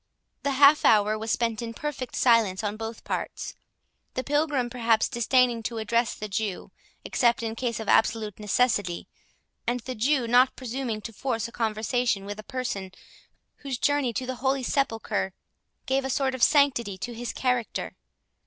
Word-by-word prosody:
The 280 - 0
half 285 +2 +6
hour 215 0 +5
was 220 +1 -5
spent 230 0 0
in 230 -1 -5
perfect 285 -4 -5
silence 225 -5 +3
on 205 0 -2
both 225 +1 -6
parts; - - -4 0.6
the 255 - -1
Pilgrim 290 -3 +1
perhaps 230 -2 +2
disdaining 240 -1 +2
to 230 +1 -4
address 230 +2 0
the 215 - -5
Jew, 200 -1 -3 0.3
except 235 -1 +2
in 225 -1 -2
case 235 -2 -2
of 220 - -6
absolute 220 -2 +2
necessity, 210 -4 0 0.6
and 245 +1 0
the 255 +3 -5
Jew 255 +2 +1
not 250 +2 +4
presuming 245 -3 -4
to 225 +2 -7
force 230 -1 -2
a - - -12
conversation 225 -1 0
with 205 +1 -6
a - - -7
person 210 -7 -4 0.7
whose 275 -3 -4
journey 285 -2 +1
to 255 - -2
the 255 0 -4
Holy 265 0 +1
Sepulchre 225 -8 -1 0.5
gave 265 +1 +1
a 265 - -3
sort 265 0 +1
of 260 - -5
sanctity 255 -10 +3
to 240 +5 -5
his 240 +1 -4
character. 250 -3 -1
235 Hz, 165 wpm, -26 LUFS, 220-260 Hz, 0.7 s, half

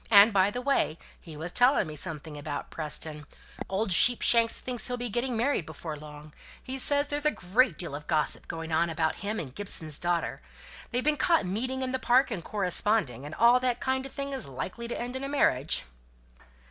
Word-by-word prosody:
And, 205 +1 +8
by 195 0 +4
the 245 +4 -4
way, 275 - +1 0.2
he 160 -3 -11
was 165 +3 -3
telling 245 0 +4
me 155 -2 -7
something 150 +1 -5
about 145 0 -5
Preston; 150 -1 -3 0.4
old 195 +1 -1
Sheepshanks 230 +3 +4
thinks 245 -3 -3
he'll 250 -1 -2
be 245 -2 -4 0.2
married 240 - 0
before 155 0 -6
long, 150 0 -11 0.3
he 265 +1 -4
says 285 +2 +2
there's 290 0 -3
a 300 - +4
great 200 - +1
deal - - -4
of 150 +1 -7
gossip 155 -3 0
going 165 0 -6
on 165 +2 +2
about 160 -1 -1
him 210 +3 -3
and 130 -5 -6
Gibson's 160 -5 -1
daughter. 175 - -1 0.5
They've 250 +1 -1
been 300 0 +2
caught 330 - +3
meeting 255 +8 -2
in 255 - -2
the 260 - -1
park, 255 +1 +3
and 185 -7 -4
corresponding, 185 - 0
and 150 - -8
all 235 +2 +6
that 250 -1 0
kind 265 0 -1
of - - -14
thing 280 0 -4
that 270 - -2
is - - -7
likely 180 - -5
to 240 - -4
end 245 +2 -4
in 260 - -4
a 275 - -3
marriage." 155 - +2
205 Hz, 205 wpm, -28 LUFS, 155-255 Hz, 0.5 s, And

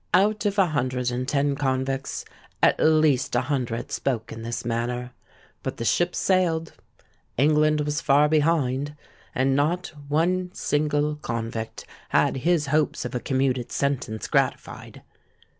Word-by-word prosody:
'—Out 205 +2 +3
of 200 0 -2
a 195 - +6
hundred 130 -5 -1
and 125 +1 -3
ten 140 0 +1
convicts, 135 -1 -2 0.4
at - - +5
least 155 -5 +3
a 120 - +3
hundred 125 -4 -2
spoke 115 -4 -2
in 115 - -7
this 115 +1 -4
manner. 120 +1 -2 0.5
But - - -4
the 115 - -4
ship 175 +8 +1
sailed,—England 155 -4 0
was 150 +1 -1
far 145 +1 +4
behind,—and 145 -3 0
not 165 +5 0
one 180 +5 +1
single 150 -1 0
convict 115 -4 -4 0.2
had - - +2
his 160 +2 +2
hopes 150 -2 0
of 125 - -5
a 125 - -1
commuted 130 -1 0
sentence 135 -6 -2
gratified. - - -2
140 Hz, 130 wpm, -25 LUFS, 125-155 Hz, 0.5 s, a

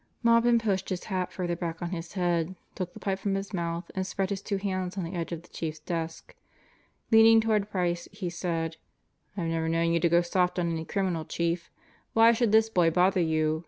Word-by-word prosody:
Maupin 235 0 +5
pushed 200 -5 -1
his 185 -2 -3
hat 185 -3 -2
further 175 -2 -2
back 170 -1 -4
on 175 0 -4
his 165 -2 -5
head, 175 -2 0 0.2
took 180 -1 -4
the - - -12
pipe 195 -1 -2
from 195 0 -1
his 195 +1 -4
mouth, 170 -1 -3
and 190 0 -2
spread 195 0 -2
his 200 -1 -2
two 200 -1 -2
hands 185 -1 -3
on 190 - -1
the 165 +3 -5
edge 170 -1 -3
of 170 -1 -5
the - - -18
Chief's 160 -1 -4
desk. 165 0 -5 0.8
Leaning 225 0 +8
toward 215 -2 +1
Price, 175 -3 -1
he 185 - -5
said: 165 -2 -3 0.6
"I've 175 - -1
never 165 0 -1
known 165 0 +1
you 170 - +3
to 170 - +2
go 170 +1 +4
soft 180 +1 +1
on 170 -1 0
any 160 -1 -3
criminal, 185 -4 -1
Chief. 170 +2 -2 0.4
Why 225 +1 +7
should 235 -2 +1
this 220 0 +5
boy 180 -6 +3
bother 180 +2 +3
you? 155 -1 +1
180 Hz, 215 wpm, -28 LUFS, 170-195 Hz, 0.8 s, Leaning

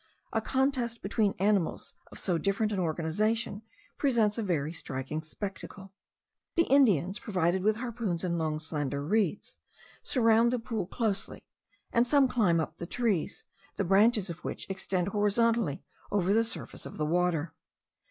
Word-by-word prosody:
A - - +1
contest 260 -3 0
between 205 +1 +1
animals 195 -3 0 0.2
of - - -10
so 175 -4 0
different 200 +3 0
an 200 - -1
organization 200 +7 -1 0.4
presents 230 -6 +2
a - - +1
very 165 -6 -1
striking 135 0 -4
spectacle. 195 +3 -8 0.6
The 335 - +5
Indians, 210 - +3
provided 185 -3 0
with 215 +2 +2
harpoons 225 -7 -3
and 175 -2 0
long 155 -1 -1
slender 145 -3 -3
reeds, 205 +1 0 0.4
surround 230 -1 +3
the 250 - +1
pool 225 -5 -3
closely; 205 -2 -2 0.5
and 235 +1 +3
some 280 0 +5
climb 205 -10 +2
up 160 - -4
the 170 - -5
trees, 215 -8 -1 0.3
the - - 0
branches 195 +1 +3
of 170 +1 -10
which - - -5
extend 190 -1 -1
horizontally 210 -4 +1 0.3
over 200 -1 +2
the 225 +1 +4
surface 230 - -6
of - - -10
the 150 - 0
water. 170 -1 0
200 Hz, 150 wpm, -29 LUFS, 170-230 Hz, 0.6 s, The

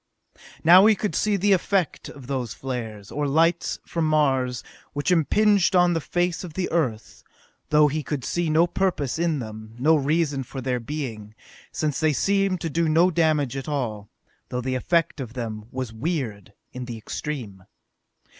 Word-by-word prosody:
Now 180 +5 +8
he 220 - +5
could 205 -3 -2
see 210 +5 +1
the 200 +1 +3
effect 190 -1 0
of 135 -3 -11
those 125 -4 -3
flares, 110 -6 -6
or 145 0 -1
lights, 165 +4 +2
from 165 -2 -1
Mars, 135 -5 +1 0.3
which 145 +5 -1
impinged 195 +3 +3
on 175 -1 +5
the 165 - -1
face 175 +3 -1
of 165 -4 -9
the 185 -1 -2
Earth, 125 -10 -2 0.5
though 150 0 +5
he 155 +2 -2
could 145 -3 -4
see 175 -2 -1
no 160 +2 +4
purpose 175 -6 -1
in 170 -2 +1
them, 110 -2 -8
no 155 +6 +4
reason 150 -1 +1
for 135 +1 -7
their 125 -1 -1
being, 115 -6 -6 0.4
since 150 -3 -1
they 155 -1 +2
seemed 195 +5 +1
to 165 - -2
do 165 +1 +1
no 170 +4 +4
damage 155 -5 +1
at 135 +2 -5
all, 110 -8 -3 0.4
though 125 - -2
the 130 +1 -2
effect 165 +4 0
of 120 -4 -6
them 110 -4 -5
was 130 -3 -5
weird 115 - -3 0.2
in 125 0 -6
the 120 -2 -6
extreme. 110 -5 -6
150 Hz, 175 wpm, -24 LUFS, 125-170 Hz, 0.5 s, Now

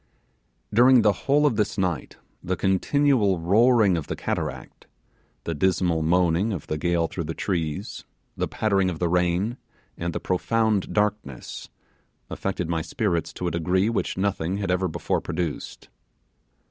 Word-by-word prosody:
During 125 +1 +6
the 105 - +5
whole 140 +9 +1
of 130 -7 +2
this 105 +1 0
night 90 -5 -2 0.3
the 95 - -1
continual 100 - +2
roaring 105 +2 +4
of 80 - -5
the - - -3
cataract - - -5 0.6
the 85 - -3
dismal 90 0 +1
moaning 90 +5 +2
of 90 -8 -4
the 75 - -3
gale 85 0 +1
through - - -5
the - - -5
trees 80 -6 -3 0.3
the - - -1
pattering 100 -3 +1
of 85 - -4
the 85 - 0
rain, 90 +6 +1 0.4
and 85 0 -3
the - - -3
profound 110 +2 0
darkness, 105 - -2 0.6
affected 95 -3 -3
my 85 -1 -1
spirits 85 -1 -1
to 90 - -4
a - - -1
degree 90 +5 +1
which 115 - -2
nothing 95 -2 -1
had 100 -2 -2
ever 90 +1 +1
before 80 - -2
produced. 85 -4 -5
95 Hz, 150 wpm, -24 LUFS, 85-105 Hz, 0.6 s, During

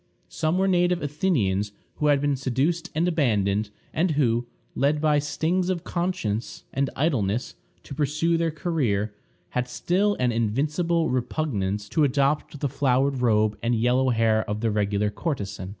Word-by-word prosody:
Some 160 +2 0
were 190 +1 +2
native 180 -2 +2
Athenians 115 - 0 0.2
who 150 - +1
had 145 -1 +4
been 145 -1 +1
seduced 140 +6 -1
and 165 +3 +2
abandoned, 105 - +1 0.2
and 175 +3 +1
who, 120 -4 +2 0.3
led 145 +2 +1
by 150 -1 +3
stings 170 +5 0
of 180 -3 -1
conscience 170 - -2
and 135 0 0
idleness 125 - 0 0.3
to - - -9
pursue 150 +4 +1
their 165 0 +1
career, 130 - -1 0.4
had 125 0 -1
still 195 +10 +1
an 125 -1 +2
invincible 150 - 0
repugnance 110 -6 -1
to 155 - +2
adopt 140 +1 +1
the 145 - +1
flowered 135 -1 +1
robe 110 -3 +2
and 120 +1 +1
yellow 125 +3 +2
hair 110 -2 +2
of 105 +1 -2
the 115 -1 +1
regular 105 0 0
courtesan. 100 - -4
135 Hz, 150 wpm, -25 LUFS, 110-160 Hz, 0.4 s, had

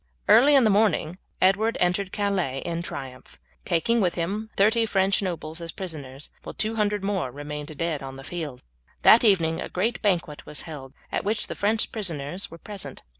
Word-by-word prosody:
Early 280 +5 +7
in 270 - +6
the 215 - +4
morning 195 -4 +2 0.2
Edward 205 +4 +3
entered 180 +2 +1
Calais 190 -10 -1
in 170 0 -2
triumph, 135 -6 -7 0.3
taking 215 +7 +2
with 180 -3 +1
him 200 +6 -2
thirty 225 +3 +4
French 195 -1 +2
nobles 170 -3 -4
as 165 -1 -5
prisoners, 150 -7 -6
while - - -9
two 215 +1 0
hundred 210 -2 0
more 195 -9 -1
remained 145 +2 -7
dead 165 -2 -1
on 135 -1 -7
the 135 - -10
field. 150 -5 -6 0.4
That 230 - +8
evening 165 -7 +3
a - - -5
great 215 +6 -1
banquet 175 -7 0
was 150 - -5
held, 140 -5 -9 0.2
at - - -1
which 215 +2 0
the - - -5
French 215 +2 +1
prisoners 175 -4 -2
were 165 - -10
present. 185 -8 -8
180 Hz, 180 wpm, -25 LUFS, 155-205 Hz, 0.4 s, That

